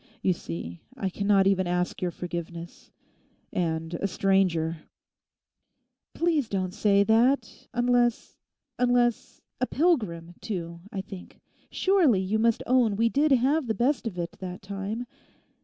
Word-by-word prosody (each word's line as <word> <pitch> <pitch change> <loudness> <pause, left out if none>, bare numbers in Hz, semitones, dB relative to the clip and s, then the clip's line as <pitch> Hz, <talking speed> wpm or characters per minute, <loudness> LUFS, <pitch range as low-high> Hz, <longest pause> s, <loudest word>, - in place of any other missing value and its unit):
You 185 - +3
see, 85 - -7 0.2
I 195 -6 -2
cannot 200 0 +3
even 190 -2 +2
ask 180 0 -1
your 180 - 0
forgiveness—and 170 -1 -6
a 185 +4 -1
stranger!' 180 -4 +1 1.4
'Please 320 -8 +1
don't 185 -2 -2
say 200 0 +3
that—unless—unless—a 245 +1 0
"pilgrim" 210 - 0
too. 170 -6 -5
I 195 - -3
think, 190 -1 -11 0.3
surely, 355 - +3
you 195 +3 0
must 230 0 +2
own 245 -5 +3
we 230 +3 +2
did 290 +5 +2
have 270 +3 +2
the 220 - 0
best 245 +3 +1
of 190 -5 -5
it 170 -1 -3
that 185 0 -7
time. 200 +4 -4
200 Hz, 120 wpm, -27 LUFS, 180-245 Hz, 1.4 s, You